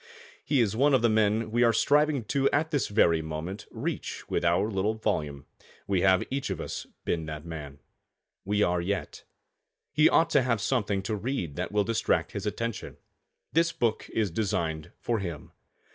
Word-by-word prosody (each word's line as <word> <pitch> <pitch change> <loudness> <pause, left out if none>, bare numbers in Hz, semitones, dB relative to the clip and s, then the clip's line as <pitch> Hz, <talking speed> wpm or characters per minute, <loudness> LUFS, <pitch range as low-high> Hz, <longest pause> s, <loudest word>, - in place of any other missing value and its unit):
He 140 -4 +2
is 110 -2 +1
one 140 +3 +4
of 125 - +1
the 120 - +5
men 110 +1 +2
we 120 +2 +1
are 120 -1 +6
striving 145 +1 +2 0.3
at 155 +2 +1
this 145 -5 0
moment 85 -1 +1
to - - -13
reach - - -4
with - - -1
our 90 +4 +3
little 100 +3 0
volume. 75 -11 -2 0.4
We 95 -3 +1
have 95 -1 +4
each 135 0 -2
of - - -3
us - - -5 0.2
been 80 -2 -1
that 75 0 -6
man. 75 -4 -7 0.7
We 105 +1 +1
are 90 -2 +1
yet. 100 +3 -4 0.7
He 155 +1 +5
ought 165 0 +3
to 145 - +5
have 120 -3 +1
something 105 -5 0
to 110 +2 -2
read 105 - -3
that - - -3
will 105 0 +2
distract 115 +2 0
his 100 0 -4
attention. 115 +1 -4 0.6
This 165 +1 +3
book 115 -7 -1
is 105 -5 0
designed 80 -6 -2
for 115 -2 -1
him. 85 -6 -6
105 Hz, 175 wpm, -28 LUFS, 85-120 Hz, 0.7 s, are